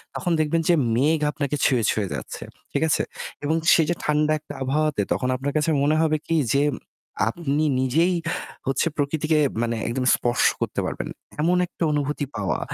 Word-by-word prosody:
তখন 175 Hz, -, -2 dB
দেখবেন 155 Hz, +2 st, +1 dB
যে -, -, +6 dB, 0.2 s
মেঘ 150 Hz, +5 st, +3 dB
আপনাকে 145 Hz, -1 st, -2 dB
ছুঁয়ে, 125 Hz, -4 st, +3 dB
ছুঁয়ে 105 Hz, -3 st, 0 dB
যাচ্ছে। -, -, -6 dB, 0.3 s
ঠিক 140 Hz, -, -1 dB
আছে? -, -, +2 dB, 0.4 s
এবং 155 Hz, +3 st, +1 dB, 0.2 s
সেই 160 Hz, -, +4 dB
যে 175 Hz, -, +1 dB
ঠান্ডা 150 Hz, 0 st, +2 dB
একটা -, -, -10 dB
আবহাওয়াতে 145 Hz, -2 st, +1 dB
তখন 130 Hz, -, -1 dB
আপনার 140 Hz, +2 st, -2 dB
কাছে 155 Hz, +2 st, +1 dB
মনে 150 Hz, +2 st, +3 dB
হবে 155 Hz, -1 st, +2 dB
কি 165 Hz, -, +1 dB, 0.2 s
যে 140 Hz, +1 st, +3 dB, 0.7 s
আপনি 150 Hz, +1 st, -1 dB, 0.2 s
নিজেই 160 Hz, +8 st, +2 dB, 0.5 s
হচ্ছে 135 Hz, +5 st, +1 dB
প্রকৃতিকে 155 Hz, +2 st, +1 dB, 0.2 s
মানে 115 Hz, 0 st, 0 dB
একদম 125 Hz, +2 st, -1 dB
স্পর্শ 120 Hz, 0 st, +1 dB, 0.2 s
করতে -, -, -2 dB
পারবেন। -, -, -4 dB, 0.3 s
এমন 175 Hz, +3 st, +3 dB
একটা -, -, -5 dB
অনুভূতি 145 Hz, 0 st, -1 dB
পাওয়া 100 Hz, -2 st, -1 dB
150 Hz, 170 wpm, -24 LUFS, 135-155 Hz, 0.7 s, যে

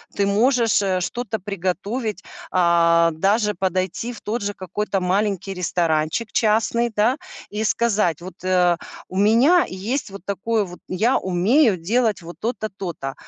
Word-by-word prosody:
Ты 200 Hz, -, +1 dB
можешь, 225 Hz, +2 st, +3 dB
э, 190 Hz, -2 st, 0 dB
что-то 220 Hz, +4 st, -3 dB
приготовить, 200 Hz, +3 st, -3 dB, 0.3 s
а, 170 Hz, -1 st, +4 dB
даже 210 Hz, +6 st, +1 dB
подойти 190 Hz, +5 st, -2 dB
в 230 Hz, -, -11 dB
тот 230 Hz, +3 st, -3 dB
же 205 Hz, 0 st, -2 dB
какой-то 195 Hz, +2 st, -2 dB
маленький 195 Hz, +1 st, -1 dB
ресторанчик 170 Hz, +3 st, -1 dB
частный, 230 Hz, +2 st, +2 dB
да, 220 Hz, +5 st, +3 dB, 0.4 s
и 210 Hz, +1 st, -2 dB
сказать: 210 Hz, -7 st, +1 dB
"Вот, 185 Hz, +1 st, -11 dB
э, 180 Hz, -2 st, +3 dB, 0.3 s
у 185 Hz, -, -6 dB
меня 235 Hz, -, +5 dB
есть 220 Hz, +7 st, -3 dB
вот 195 Hz, -1 st, -11 dB
такое 210 Hz, +2 st, 0 dB
вот, 180 Hz, -1 st, -11 dB
я 220 Hz, +8 st, +2 dB
умею 195 Hz, -, +3 dB
делать 215 Hz, +4 st, 0 dB
вот 170 Hz, +1 st, -9 dB
то-то, 225 Hz, -1 st, -3 dB
то-то. 170 Hz, -8 st, -5 dB
200 Hz, 145 wpm, -22 LUFS, 180-225 Hz, 0.4 s, меня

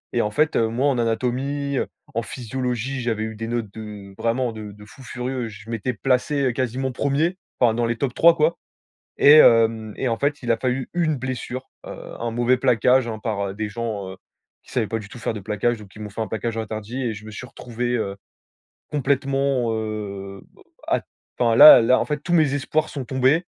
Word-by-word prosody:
et, 120 Hz, -, +3 dB
en 105 Hz, -, 0 dB
fait, 150 Hz, +7 st, +1 dB
heu, 115 Hz, -, +3 dB
moi, 120 Hz, +5 st, -1 dB
en 130 Hz, -, 0 dB
anatomie, 130 Hz, +5 st, -1 dB, 0.4 s
en 115 Hz, -, 0 dB
physiologie, 125 Hz, +2 st, -3 dB
j'avais 115 Hz, -2 st, -1 dB
eu 110 Hz, 0 st, -5 dB
des 115 Hz, +1 st, -5 dB
notes 115 Hz, -4 st, -3 dB
de 105 Hz, -3 st, -9 dB
vraiment 115 Hz, +2 st, 0 dB
de 105 Hz, -2 st, -8 dB
de 105 Hz, 0 st, -14 dB
fous 120 Hz, +5 st, -15 dB
furieux. 125 Hz, 0 st, -4 dB
Je 110 Hz, +1 st, -12 dB
m'étais 115 Hz, +3 st, -2 dB
placé 135 Hz, +3 st, +1 dB
quasiment 130 Hz, +2 st, -2 dB
1er, 145 Hz, +8 st, 0 dB, 0.2 s
enfin 120 Hz, -3 st, +4 dB
dans 120 Hz, +1 st, 0 dB
les 115 Hz, 0 st, 0 dB
tops 130 Hz, -2 st, -2 dB
3, 170 Hz, +4 st, +6 dB
quoi 160 Hz, +1 st, +2 dB, 0.6 s
et 145 Hz, -, +8 dB
hem, 115 Hz, -6 st, +5 dB
et, 130 Hz, -, -1 dB
en 115 Hz, -, 0 dB
fait, 145 Hz, -1 st, -1 dB
il 120 Hz, -, -3 dB
a 115 Hz, -, +4 dB
fallu 130 Hz, +1 st, -2 dB
1 170 Hz, -3 st, +1 dB
blessure, 130 Hz, 0 st, -5 dB, 0.2 s
heu, -, -, -6 dB, 0.3 s
un 115 Hz, -1 st, -2 dB
mauvais 120 Hz, +2 st, +2 dB
plaquage, 125 Hz, 0 st, +3 dB
hein, 110 Hz, -2 st, -5 dB
par 100 Hz, -3 st, -2 dB
des 110 Hz, 0 st, -3 dB
gens, 105 Hz, -4 st, -4 dB
heu, 95 Hz, -, -9 dB, 0.5 s
qui -, -, -16 dB
savaient 115 Hz, -5 st, 0 dB
pas 115 Hz, -, -2 dB
du 105 Hz, -, -10 dB
tout 120 Hz, -, -11 dB
faire -, -, -2 dB
de -, -, -5 dB
plaquage, 105 Hz, +4 st, -1 dB
donc 105 Hz, -, -11 dB
qui 105 Hz, -, -14 dB
m'ont 105 Hz, -1 st, -6 dB
fait 105 Hz, -, -7 dB
un 110 Hz, -, -1 dB
plaquage 110 Hz, +2 st, -3 dB
interdit 110 Hz, +3 st, -5 dB
et 120 Hz, -4 st, -1 dB
je 105 Hz, +1 st, -10 dB
me 110 Hz, -, -9 dB
suis 115 Hz, +4 st, -8 dB
retrouvé, 120 Hz, 0 st, -5 dB
heu, 100 Hz, -4 st, -2 dB, 0.8 s
complètement, 140 Hz, -2 st, 0 dB
heu, 100 Hz, -3 st, -5 dB, 0.4 s
à -, -, +1 dB, 0.4 s
enfin 115 Hz, -2 st, +3 dB
là 145 Hz, -2 st, +11 dB
là 125 Hz, +3 st, +4 dB
en -, -, +1 dB
fait, 150 Hz, -, -2 dB
tous 175 Hz, -, -1 dB
mes 155 Hz, -5 st, +3 dB
espoirs 155 Hz, +2 st, -1 dB
sont 135 Hz, -4 st, -5 dB
tombés, 135 Hz, +7 st, +2 dB
120 Hz, 210 wpm, -23 LUFS, 110-130 Hz, 0.8 s, là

